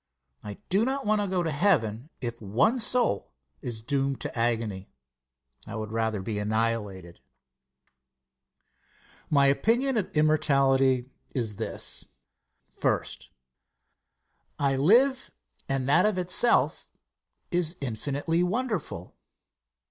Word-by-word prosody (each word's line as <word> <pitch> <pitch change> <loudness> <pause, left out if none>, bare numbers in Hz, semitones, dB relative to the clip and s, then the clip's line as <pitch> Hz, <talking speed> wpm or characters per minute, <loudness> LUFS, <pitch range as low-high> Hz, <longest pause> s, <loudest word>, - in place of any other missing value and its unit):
I 105 -1 -7
do 195 +4 +3
not 270 +3 -2
want 210 0 +2
to 205 - -1
go 185 -2 0
to 160 - -1
heaven 140 - +1
if 120 -2 -5
one 120 - +2
soul 240 - +1 0.3
is 110 -3 -5
doomed 135 +1 -1
to - - -5
agony. 115 -5 -1 0.8
I 110 - -6
would 110 -1 -5
rather 110 -3 -1
be 105 +1 -3
annihilated. 105 -5 -2 2.1
My 140 -2 +4
opinion 235 - +2
of 205 - -1
immortality 135 -4 +3 0.2
is 110 -6 -2
this: - - -3 0.6
First. - - -2 1.3
I 140 -1 +1
live, 245 - +3 0.4
and 135 -1 -1
that 145 +8 +5
of 210 -3 -1
itself 180 +6 +2 0.6
is 175 -1 +2
infinitely 140 +6 -2
wonderful. 185 - -3
135 Hz, 110 wpm, -27 LUFS, 115-185 Hz, 2.1 s, that